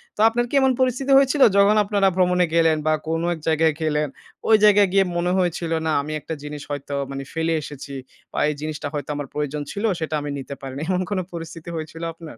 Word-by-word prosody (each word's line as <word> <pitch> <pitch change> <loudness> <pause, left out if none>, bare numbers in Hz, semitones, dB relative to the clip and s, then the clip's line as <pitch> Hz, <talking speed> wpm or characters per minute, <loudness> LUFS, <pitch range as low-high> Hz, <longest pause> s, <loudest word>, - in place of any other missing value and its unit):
তো - - -17
আপনার 240 +1 0
কি - - -15
এমন 265 0 +4
পরিস্থিতি 260 +1 +1
হয়েছিল, 275 +1 +3 0.2
যখন 200 +1 +5
আপনারা 200 -1 +2
ভ্রমণে 180 -1 +3
গেলেন 165 -1 +4
বা 155 - +4
কোন 165 0 -1
এক 165 - -8
জায়গায় 160 0 +3
গেলেন, 150 -1 +1 0.4
ওই 220 - +8
জায়গায় 205 -1 +6
গিয়ে 195 -1 +4
মনে 175 +1 0
হয়েছিল, 175 -2 -1 0.2
"না - - +1
আমি 150 +2 -5
একটা 160 - -5
জিনিস 150 0 -6
হয়তো 145 0 -5 0.2
মানে 135 0 -5
ফেলে 165 0 0
এসেছি 145 -1 -8 0.4
বা - - -2
এই 150 - -2
জিনিসটা 155 -1 -4
হয়তো 145 -2 -4
আমার 145 -1 -4
প্রয়োজন 150 0 -2
ছিল, 205 - -5 0.2
সেটা 160 -1 -2
আমি 145 - -5
নিতে 140 +1 -7
পারি 135 -1 -7
নাই" 150 - -3
এমন 185 0 +1
কোন 200 - 0
পরিস্থিতি 165 0 -7
হয়েছিল 160 +1 -6
আপনার? 160 -6 -11
165 Hz, 220 wpm, -22 LUFS, 150-195 Hz, 0.4 s, ওই